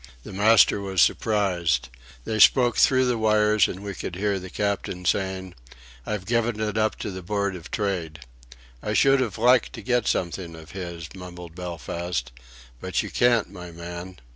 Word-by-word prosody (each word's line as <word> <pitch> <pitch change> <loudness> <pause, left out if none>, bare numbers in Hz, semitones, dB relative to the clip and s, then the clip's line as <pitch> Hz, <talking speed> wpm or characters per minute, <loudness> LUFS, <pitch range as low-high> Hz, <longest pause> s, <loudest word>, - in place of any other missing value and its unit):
The - - -9
master 105 +1 +5
was 95 -2 -2
surprised. 85 - +2 0.4
They 110 - -2
spoke 120 +1 +5
through 130 -1 +4
the 125 -2 0
wires, 105 -1 +3
and 95 +2 -7
we 100 -1 -5
could 90 - -6
hear 100 +1 0
the 95 0 -9
Captain 100 -2 -3
saying: 95 0 -1 0.5
"I've 105 -3 -3
given 115 0 0
it 110 0 -2
up 110 -1 +1
to 105 - -3
the 95 0 -7
Board 100 +1 -2
of 85 -3 -10
Trade." 90 -7 -3 0.6
"I 105 - -2
should 135 +4 +4
've 110 -7 -2
liked 125 +2 +4
to 115 - -8
get 125 -1 +1
something 85 -1 -2
of 80 -1 -12
his," 85 -4 -6
mumbled 90 -2 -10
Belfast. 85 -5 -4 0.5
"But - - -1
you - - -7
can't, 120 -2 +2
my 90 0 -9
man. 85 +2 -8
95 Hz, 170 wpm, -25 LUFS, 90-110 Hz, 0.6 s, master